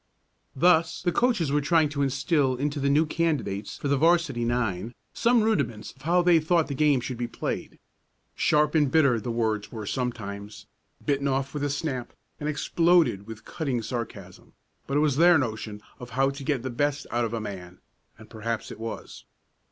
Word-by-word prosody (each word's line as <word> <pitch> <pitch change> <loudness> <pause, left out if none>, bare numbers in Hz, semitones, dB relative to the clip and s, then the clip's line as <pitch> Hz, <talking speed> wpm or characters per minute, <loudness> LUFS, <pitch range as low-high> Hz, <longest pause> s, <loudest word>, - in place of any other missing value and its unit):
Thus 165 +1 +3
the 175 - +2
coaches 210 - +1
were 145 +1 +2
trying 155 +2 +3
to 145 -1 -3
instill 135 0 +1
into 145 +3 -2
the 140 0 +1
new 150 +3 +4
candidates 150 -12 -2
for - - -4
the 140 0 +2
'varsity 165 -5 +2
nine 115 -2 -1 0.2
some 235 -1 +3
rudiments 140 - -1
of 135 - -22
how 175 +4 +2
they 175 -2 +5
thought 160 0 +2
the 140 - -4
game 145 -2 +3
should 120 0 -5
be 120 - -1
played. - - -5 0.6
Sharp 150 0 +2
and 150 -4 +3
bitter 140 -6 +4
the 110 - -5
words 110 -3 -1
were 110 -3 -6
sometimes, 105 -4 -5 0.4
bitten 140 -1 +1
off 135 0 -1
with 145 -1 -3
a 145 - 0
snap 140 -4 -3 0.3
and 150 - -2
exploded 165 - +2
with 110 -1 -9
cutting 135 -8 -2
sarcasm, 120 0 -7 0.3
but 140 - 0
it - - +3
was 145 -3 +2
their 175 +1 +7
notion 110 -5 -4 0.2
of 125 - -9
how 135 0 +3
to 140 0 -8
get 135 -3 -1
the 130 - -3
best 145 +3 -1
out 120 0 +1
of 115 0 -2
a - - -2
man, 95 -4 -7 0.4
and 110 +1 -14
perhaps 115 0 -4
it - - -9
was. 115 0 -7
135 Hz, 190 wpm, -26 LUFS, 115-155 Hz, 0.6 s, their